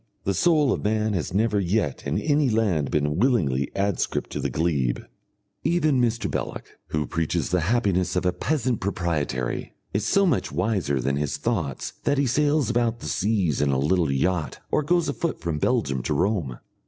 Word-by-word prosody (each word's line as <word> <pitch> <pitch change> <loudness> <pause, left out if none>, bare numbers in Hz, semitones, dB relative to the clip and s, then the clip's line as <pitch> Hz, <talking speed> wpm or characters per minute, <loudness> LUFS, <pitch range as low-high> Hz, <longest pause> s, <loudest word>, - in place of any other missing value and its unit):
The 100 - 0
soul 150 - +3
of - - -4
man 110 0 +1
has 85 -6 -2
never 105 +2 +2
yet 90 -7 -1
in 70 - 0
any 145 -2 +2
land 100 - +1
been 75 0 0
willingly 80 - +2
adscript 100 -1 -1
to - - -3
the - - -1
glebe. 75 -7 0 0.6
Even 155 -6 +2
Mr. 115 -1 0
Belloc, - - -4 0.2
who 75 -1 -1
preaches 80 +2 -1
the 90 - +3
happiness 95 -1 +1
of 90 - 0
a 90 - +2
peasant 125 - -1
proprietary, 80 -10 -2 0.2
is 100 - 0
so 200 0 +3
much 165 -9 +1
wiser 90 -4 0
than 70 +2 0
his 75 -1 -1
thoughts 80 - -2
that 145 -1 +2
he 140 - +2
sails 145 +3 +2
about 120 -1 +1
the - - -9
seas 90 - 0
in 75 - +2
a 70 - +2
little 80 +3 +2
yacht 80 +4 0
or - - +3
goes 170 +3 +1
afoot 170 - -2
from 80 -3 -2
Belgium 75 - +1
to - - -1
Rome. 90 - 0
95 Hz, 180 wpm, -25 LUFS, 75-120 Hz, 0.6 s, soul